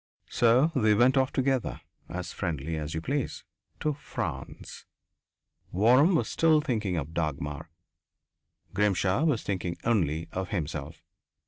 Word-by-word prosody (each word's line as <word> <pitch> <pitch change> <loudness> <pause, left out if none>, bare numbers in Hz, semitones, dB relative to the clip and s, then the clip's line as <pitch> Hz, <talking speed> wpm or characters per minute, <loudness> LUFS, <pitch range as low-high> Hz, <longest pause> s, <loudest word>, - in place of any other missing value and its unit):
So 125 +7 +4
they 110 -5 +4
went 125 +5 +4
off 130 0 +2
together, 130 - 0 0.3
as 90 -2 -5
friendly 80 -4 -3
as 75 0 -4
you 80 - -2
please, 140 - -2 0.4
to 150 - +1
France. 145 - -6 0.9
Waram 125 - +5
was - - +1
still 160 -2 +3
thinking 110 - -1
of 80 +1 -4
Dagmar; 75 -1 -3 1.0
Grimshaw 100 - +2
was 145 -9 +1
thinking 90 -3 -3
only 85 -9 +1
of 95 -1 -4
himself. 75 -6 -4
100 Hz, 125 wpm, -28 LUFS, 80-130 Hz, 1.0 s, Waram